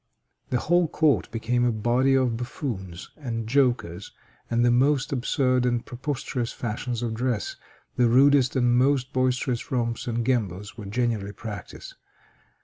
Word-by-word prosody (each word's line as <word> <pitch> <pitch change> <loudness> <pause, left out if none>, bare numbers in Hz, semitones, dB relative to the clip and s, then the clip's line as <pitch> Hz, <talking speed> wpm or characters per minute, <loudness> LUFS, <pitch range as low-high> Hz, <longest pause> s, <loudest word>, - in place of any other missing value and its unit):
The 125 - +1
whole 175 +6 +2
court 145 - +2
became 120 +1 0
a 120 - +3
body 120 +5 +2
of 130 -3 +2
buffoons 115 - -5
and 115 -6 -4
jokers, 120 -9 0 0.4
and 120 +1 +2
the 120 - +4
most 135 +3 +2
absurd 130 -1 +1
and 120 -1 0
preposterous 125 -2 -3
fashions 120 +1 -4
of 115 -2 -2
dress, 115 -3 -2 0.4
the 120 -2 +4
rudest 135 +1 +5
and 120 -2 +3
most 130 +1 +2
boisterous 130 -1 0
romps 115 -2 -1
and 115 -1 -1
gambols 105 -6 -1
were 105 - -8
generally 110 -2 -1
practiced. 105 -3 -8
120 Hz, 140 wpm, -25 LUFS, 115-130 Hz, 0.4 s, rudest